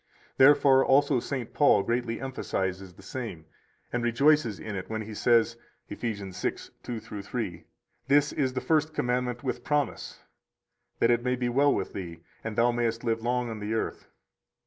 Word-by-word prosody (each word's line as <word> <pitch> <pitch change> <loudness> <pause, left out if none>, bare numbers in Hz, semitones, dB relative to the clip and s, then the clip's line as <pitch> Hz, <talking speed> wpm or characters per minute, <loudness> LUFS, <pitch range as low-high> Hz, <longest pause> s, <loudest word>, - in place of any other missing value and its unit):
133 135 - +7
Therefore 135 -2 +4
also 140 -1 +4
St. 125 -1 -5
Paul 125 -9 +4
greatly 115 0 -1
emphasizes 95 -8 -3
the - - -16
same 110 -11 -6 0.5
and 120 -1 -1
rejoices 120 -2 +3
in 105 -2 -6
it 95 - -6
when 110 0 -3
he 110 +1 -8
says, 115 +1 +3 0.3
Eph. - - -6
6:2 105 +1 -5
3: 100 -5 -4 0.4
This 145 +1 +3
is 130 -3 0
the 130 - -2
first 155 +3 +1
commandment 125 +1 -1
with 130 - -3
promise: 145 -5 -2 0.7
That 115 - +3
it 120 0 +2
may 125 0 +1
be 125 -1 -1
well 140 +4 +4
with - - -2
thee, 85 -4 -7 0.2
and 110 -1 -4
thou 120 +2 +4
mayest 115 -1 -1
live 115 -1 0
long 120 0 -1
on 110 - -6
the 105 +2 -2
earth. 110 - -3
120 Hz, 170 wpm, -28 LUFS, 110-130 Hz, 0.7 s, 133